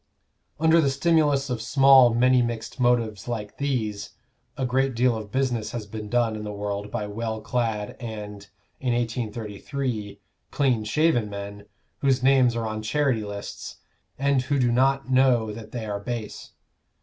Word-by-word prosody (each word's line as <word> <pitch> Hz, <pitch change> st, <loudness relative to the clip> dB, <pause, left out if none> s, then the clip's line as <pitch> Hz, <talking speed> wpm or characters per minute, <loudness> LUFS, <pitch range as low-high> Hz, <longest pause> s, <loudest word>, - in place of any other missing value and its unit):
Under 160 Hz, +1 st, +5 dB
the 140 Hz, -, +2 dB
stimulus 145 Hz, -2 st, +2 dB
of 120 Hz, -3 st, -2 dB
small 135 Hz, 0 st, +6 dB
many 125 Hz, +1 st, +4 dB
mixed 120 Hz, +1 st, -4 dB
motives 115 Hz, -5 st, +1 dB
like 110 Hz, -4 st, -5 dB
these, 110 Hz, -8 st, -2 dB, 0.4 s
a 130 Hz, -, -1 dB
great 130 Hz, 0 st, +1 dB
deal 120 Hz, 0 st, +3 dB
of 105 Hz, -2 st, -7 dB
business 120 Hz, -4 st, -1 dB
has 115 Hz, -3 st, -4 dB
been 105 Hz, 0 st, -7 dB
done 120 Hz, -2 st, +1 dB
in 105 Hz, -, -6 dB
the 105 Hz, -, -5 dB
world 100 Hz, 0 st, -4 dB
by 105 Hz, -, -3 dB
well 110 Hz, +2 st, -4 dB
clad 110 Hz, -2 st, -2 dB
and, 105 Hz, -4 st, -7 dB, 0.3 s
in 125 Hz, -3 st, 0 dB
1833, 115 Hz, -1 st, -4 dB, 0.3 s
clean 130 Hz, -6 st, +1 dB
shaven 120 Hz, -1 st, +1 dB
men, 100 Hz, 0 st, -8 dB, 0.3 s
whose 135 Hz, -2 st, +1 dB
names 130 Hz, -3 st, +4 dB
are 115 Hz, -1 st, -2 dB
on 110 Hz, 0 st, -3 dB
charity 130 Hz, 0 st, 0 dB
lists, 100 Hz, -1 st, -7 dB, 0.4 s
and 140 Hz, -1 st, +2 dB
who 140 Hz, +2 st, -1 dB
do 125 Hz, -3 st, +2 dB
not 135 Hz, +2 st, +2 dB
know 125 Hz, -4 st, +3 dB
that 110 Hz, 0 st, -10 dB
they 120 Hz, -3 st, -5 dB
are 105 Hz, -1 st, -3 dB
base. 110 Hz, 0 st, -6 dB
120 Hz, 160 wpm, -25 LUFS, 105-130 Hz, 0.4 s, small